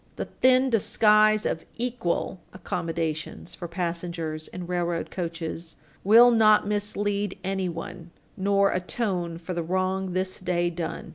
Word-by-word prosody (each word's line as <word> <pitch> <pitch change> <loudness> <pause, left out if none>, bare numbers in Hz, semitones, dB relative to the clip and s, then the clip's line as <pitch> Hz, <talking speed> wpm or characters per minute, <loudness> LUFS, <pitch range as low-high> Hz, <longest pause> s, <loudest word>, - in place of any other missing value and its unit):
The - - -3
thin 260 0 +3
disguise 215 -1 +4
of 160 - -1
"equal" 235 -7 -2
accommodations 165 -3 -4
for 175 - -6
passengers 170 -2 -4
in 180 -1 -7
railroad 175 -1 -2
coaches 165 -1 -5 0.3
will 230 +5 +7
not 215 -2 +5
mislead 205 -1 -1
anyone, 180 -2 -4 0.3
nor 200 0 +2
atone 180 -3 -2
for 175 +2 -6
the 170 - -2
wrong 185 +2 -1
this 185 0 -2
day 175 -1 0
done. 170 -1 -5
185 Hz, 125 wpm, -26 LUFS, 170-205 Hz, 0.3 s, will